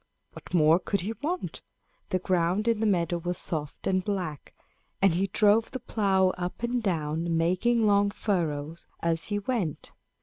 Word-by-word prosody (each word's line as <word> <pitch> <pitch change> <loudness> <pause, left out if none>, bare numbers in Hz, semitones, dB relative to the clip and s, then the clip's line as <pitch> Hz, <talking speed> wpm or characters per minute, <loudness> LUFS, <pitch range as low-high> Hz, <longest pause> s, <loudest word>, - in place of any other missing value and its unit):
What - - -12
more 165 -1 +5
could 200 +1 -1
he 210 +5 -3
want? 345 +5 -3 0.5
The 185 - +1
ground 185 +3 0
in 230 -2 +2
the 220 - +1
meadow 175 -3 +1
was 175 +1 -3
soft 150 -4 -4
and 185 -1 +1
black, 180 -8 -4 0.4
and 195 -3 +4
he 190 +3 +1
drove 210 +3 +3
the 260 - -5
plow 195 -6 +2
up 180 +5 -4
and 240 +1 0
down, 165 -3 -1
making 200 +8 +2
long 200 -1 +4
furrows 165 -7 -2
as 165 -1 0
he 205 - -1
went. 205 - -3
185 Hz, 165 wpm, -27 LUFS, 170-210 Hz, 0.5 s, more